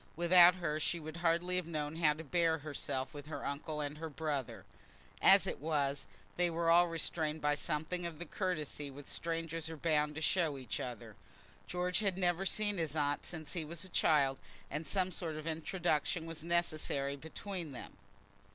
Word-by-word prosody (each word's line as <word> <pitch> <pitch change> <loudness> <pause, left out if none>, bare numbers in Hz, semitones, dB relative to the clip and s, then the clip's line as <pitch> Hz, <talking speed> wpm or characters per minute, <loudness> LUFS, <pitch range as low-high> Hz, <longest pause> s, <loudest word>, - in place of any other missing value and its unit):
Without 175 +1 +7
her 155 -4 -1
she 170 +2 0
would 155 +1 -7
hardly 175 +1 +2
have 180 -3 -1
known 155 -1 -3
how 155 -3 +4
to 155 +2 -8
bear 165 +1 +2
herself 145 -3 -3
with 145 0 -8
her 145 -3 -5
uncle 150 +2 -3
and 145 +1 -4
her 160 0 -4
brother. 145 -3 -3 0.6
As - - +7
it - - -3
was, 145 -2 0 0.3
they 175 0 +3
were 165 0 +2
all 175 +1 +7
restrained 160 -1 -1
by 145 -1 +2
something 160 +4 -2
of 165 -2 -8
the 175 - -5
courtesy 155 -5 -3
which 140 +1 -10
strangers 165 0 -2
are 160 - -6
bound 150 -1 +1
to - - -3
show 165 -2 +2
to - - -6
each 125 -6 -4
other. 120 -3 -6 0.5
George 180 +1 0
had 200 -4 +1
never 180 0 +1
seen 205 -2 0
his 160 -2 -1
aunt 145 -1 0
since 160 -4 -5
he 170 - -1
was 165 +3 -5
a - - -11
child, 140 -5 +3 0.3
and 150 +2 -3
some 185 +1 +1
sort 165 -4 -3
of 155 0 -6
introduction 165 0 0
was 165 -2 -6
necessary 155 -5 0
between 165 +3 -6
them. 125 - -9
160 Hz, 190 wpm, -35 LUFS, 150-175 Hz, 0.6 s, Without